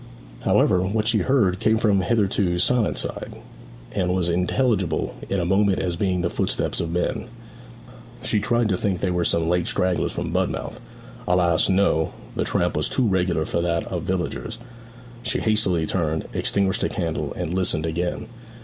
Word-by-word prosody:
However, 90 Hz, -, +3 dB
what 105 Hz, +3 st, -1 dB
she 115 Hz, -2 st, +3 dB
heard 105 Hz, -9 st, +2 dB
came 110 Hz, 0 st, +3 dB
from 105 Hz, -3 st, +3 dB
the 90 Hz, -, -1 dB
hitherto 100 Hz, -5 st, +1 dB
silent 115 Hz, +5 st, +2 dB
side, -, -, -4 dB, 0.6 s
and 90 Hz, -3 st, 0 dB
was 90 Hz, -2 st, 0 dB
intelligible 90 Hz, 0 st, 0 dB, 0.2 s
in 100 Hz, -, 0 dB
a 85 Hz, -, 0 dB
moment 95 Hz, +2 st, +2 dB
as 90 Hz, -2 st, -1 dB
being 90 Hz, 0 st, 0 dB
the 85 Hz, -, 0 dB
footsteps -, -, -1 dB
of 85 Hz, -, -2 dB
men. 90 Hz, +5 st, -1 dB, 1.0 s
She 110 Hz, -5 st, +2 dB
tried 120 Hz, +2 st, +2 dB
to 95 Hz, -, +1 dB
think 95 Hz, -3 st, -1 dB
they 95 Hz, -, 0 dB
were 90 Hz, -1 st, 0 dB
some 85 Hz, -1 st, +1 dB
late 90 Hz, 0 st, +1 dB
stragglers 90 Hz, -1 st, +1 dB
from -, -, -4 dB
Budmouth. -, -, -2 dB, 0.5 s
Alas! 90 Hz, -2 st, +3 dB
no; 95 Hz, -5 st, +2 dB, 0.2 s
the -, -, 0 dB
tramp -, -, 0 dB
was -, -, 0 dB
too 125 Hz, -, +1 dB
regular 90 Hz, -5 st, +1 dB
for 85 Hz, -, -1 dB
that 85 Hz, -1 st, 0 dB
of -, -, -2 dB
villagers. -, -, -3 dB, 0.6 s
She 125 Hz, -, 0 dB
hastily 105 Hz, -7 st, +2 dB
turned, 80 Hz, -2 st, -1 dB
extinguished 100 Hz, 0 st, +1 dB
the -, -, +1 dB
candle, 85 Hz, -5 st, -3 dB
and 80 Hz, -, -3 dB
listened 90 Hz, -4 st, +1 dB
again. 85 Hz, +6 st, -2 dB
90 Hz, 170 wpm, -23 LUFS, 85-105 Hz, 1.0 s, However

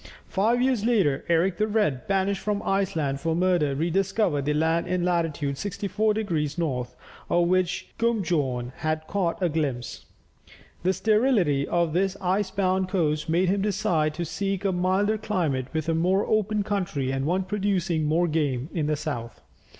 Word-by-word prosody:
Five 230 Hz, +5 st, +1 dB
years 255 Hz, -5 st, +1 dB
later, 200 Hz, -, +2 dB
Eric 170 Hz, +2 st, +2 dB
the 215 Hz, -, +1 dB
Red, 205 Hz, -, 0 dB
banished 195 Hz, 0 st, 0 dB
from 210 Hz, -1 st, -1 dB
Iceland 160 Hz, -8 st, 0 dB
for 160 Hz, +3 st, -1 dB
murder, 175 Hz, -5 st, +2 dB
rediscovered 175 Hz, -1 st, 0 dB
the 150 Hz, -, +1 dB
land 160 Hz, +2 st, +1 dB
in 180 Hz, -1 st, 0 dB
latitude 160 Hz, -5 st, -1 dB
64 205 Hz, +2 st, -1 dB
degrees 160 Hz, -9 st, -1 dB
north, 125 Hz, -7 st, -2 dB, 0.3 s
of 175 Hz, 0 st, +3 dB
which 185 Hz, -1 st, 0 dB
Guunbjorn 155 Hz, -, 0 dB
had 155 Hz, 0 st, -2 dB
caught 180 Hz, -2 st, -1 dB
a -, -, +4 dB
glimpse. 145 Hz, -7 st, -3 dB, 0.7 s
The 185 Hz, +2 st, +2 dB
sterility 210 Hz, -, +2 dB
of 170 Hz, -2 st, +1 dB
this 190 Hz, +2 st, +1 dB
ice 190 Hz, +1 st, 0 dB
bound 190 Hz, -1 st, 0 dB
coast 155 Hz, -5 st, 0 dB
made 175 Hz, +3 st, +2 dB
him 195 Hz, +1 st, +1 dB
decide 175 Hz, -7 st, 0 dB
to 170 Hz, -, -3 dB
seek 195 Hz, +3 st, -3 dB
a 195 Hz, -, +3 dB
milder 190 Hz, +4 st, +1 dB
climate 170 Hz, -, -1 dB
with 160 Hz, -1 st, -2 dB
a 165 Hz, -, +2 dB
more 185 Hz, +5 st, +2 dB
open 215 Hz, -1 st, +1 dB
country, 180 Hz, -10 st, -2 dB
and 135 Hz, 0 st, -1 dB
one 185 Hz, +3 st, +1 dB
producing 185 Hz, -5 st, 0 dB
more 165 Hz, +4 st, +2 dB
game, 145 Hz, -4 st, -1 dB
in 155 Hz, -4 st, -1 dB
the 150 Hz, -, +1 dB
south. 120 Hz, -7 st, -5 dB
175 Hz, 165 wpm, -25 LUFS, 155-195 Hz, 0.7 s, a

